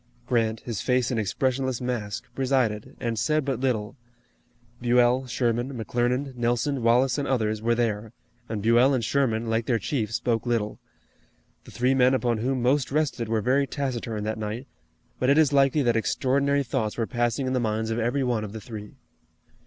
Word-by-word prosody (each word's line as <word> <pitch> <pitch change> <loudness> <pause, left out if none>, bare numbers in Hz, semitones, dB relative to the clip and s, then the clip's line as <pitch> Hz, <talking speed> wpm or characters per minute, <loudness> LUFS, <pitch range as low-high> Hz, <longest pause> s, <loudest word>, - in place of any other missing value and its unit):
Grant, 115 -3 0
his 115 -5 -4
face 125 -1 +1
an 120 - 0
expressionless 130 +4 -1
mask, 120 -4 -3
presided, 125 -6 0
and 115 -3 -2
said 155 +4 +1
but 135 -4 -1
little. 115 -6 -1 0.9
Buell, 125 +1 +3
Sherman, 120 +2 -1
McClernand, 125 +4 -1
Nelson, 120 +3 0
Wallace 120 +3 +3
and 140 - -2
others, 110 -4 0
were 115 +1 +2
there, 110 -2 -1 0.4
and 105 -3 -3
Buell 120 +4 +5
and 120 -4 -1
Sherman, 115 -4 0
like 115 0 0
their 120 - +2
chief, 115 -3 -2
spoke 115 0 -1
little. 115 -3 -1 0.9
The - - -12
three 125 +2 +1
men 130 0 +4
upon 120 -3 0
whom 130 +2 -1
most 135 +2 +2
rested 135 -6 0
were 110 -1 +1
very 135 +4 +2
taciturn 120 -7 -3
that 110 +1 -3
night, 110 +4 -4 0.5
but 130 - +1
it 140 - +5
is 150 -3 +4
likely 140 +1 +4
that 120 -2 +2
extraordinary 140 +4 +1
thoughts 115 -4 -2
were 115 - 0
passing 120 +3 -1
in 130 - -1
the 130 - +1
minds 110 -1 -1
of 115 - -1
every 120 +4 0
one 120 -4 0
of 105 -1 -7
the 110 - -5
three. 105 -3 -9
120 Hz, 180 wpm, -26 LUFS, 115-130 Hz, 0.9 s, Buell